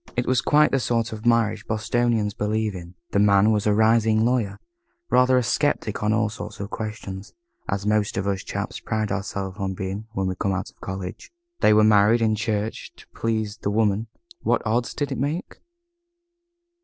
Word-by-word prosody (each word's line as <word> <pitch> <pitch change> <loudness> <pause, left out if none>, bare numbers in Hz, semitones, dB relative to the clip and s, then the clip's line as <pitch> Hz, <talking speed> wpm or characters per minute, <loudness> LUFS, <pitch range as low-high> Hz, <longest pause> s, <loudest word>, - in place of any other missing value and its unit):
It 125 - 0
was 130 -1 +2
quite 150 +1 +4
the 135 - +2
sort 115 -2 0
of 110 +2 -5
marriage 115 -2 +2
Bostonians 110 -1 0
believe 105 +1 -1
in. 90 -1 -9 0.2
The 100 - +2
man 100 +1 +5
was 105 -1 +1
a 105 - +4
rising 110 0 +3
lawyer, 120 -5 0 0.5
rather 125 0 +5
a 125 - +2
sceptic 120 -4 0
on 105 0 +1
all 115 0 +2
sorts 105 0 -8
of 100 +1 -6
questions, 105 -2 -6 0.4
as 100 +1 -2
most 105 -1 +1
of 95 - -1
us 100 -1 -1
chaps - - -4
pride 110 -1 -2
ourselves 100 -1 -3
on 95 -1 -2
being, 95 +4 -5
when 95 -2 -1
we 95 - 0
come 95 +2 -1
out 95 0 -4
of - - -38
college. 95 -1 -6 0.3
They - - +5
were 105 0 +6
married 110 +2 +5
in 110 -1 +3
church 110 0 -2
to - - -16
please 110 -2 -2
the 100 - -3
Woman. 105 +1 +1 0.3
What - - +1
odds 120 +2 0
did 145 - -2
it - - -3
make? 150 +7 -3
110 Hz, 190 wpm, -24 LUFS, 100-115 Hz, 0.5 s, were